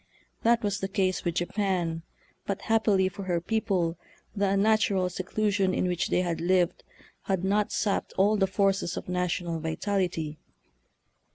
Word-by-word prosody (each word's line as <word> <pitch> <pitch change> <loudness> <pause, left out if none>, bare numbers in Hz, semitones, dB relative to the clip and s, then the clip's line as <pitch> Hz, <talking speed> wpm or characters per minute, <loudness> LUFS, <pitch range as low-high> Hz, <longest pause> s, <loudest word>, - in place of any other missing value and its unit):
That 235 0 +3
was 200 -1 0
the 195 - -2
case 190 -2 0
with 170 -2 -1
Japan, 175 -3 -1 0.5
but 200 0 -3
happily 210 -4 +3
for 190 +1 -6
her 175 -2 0
people 180 -4 -1 0.4
the 200 -1 +1
unnatural 200 -2 +2
seclusion 190 +1 0
in - - +1
which 180 -1 0
they - - +2
had 170 -3 -2
lived 180 0 +1 0.4
had 190 -2 0
not 205 +2 +1
sapped 205 -1 -1
all 205 +3 +4
the 195 -2 +2
forces 195 -2 +1
of - - -6
national 180 -2 -1
vitality. 160 -2 -2
190 Hz, 150 wpm, -28 LUFS, 175-200 Hz, 0.5 s, all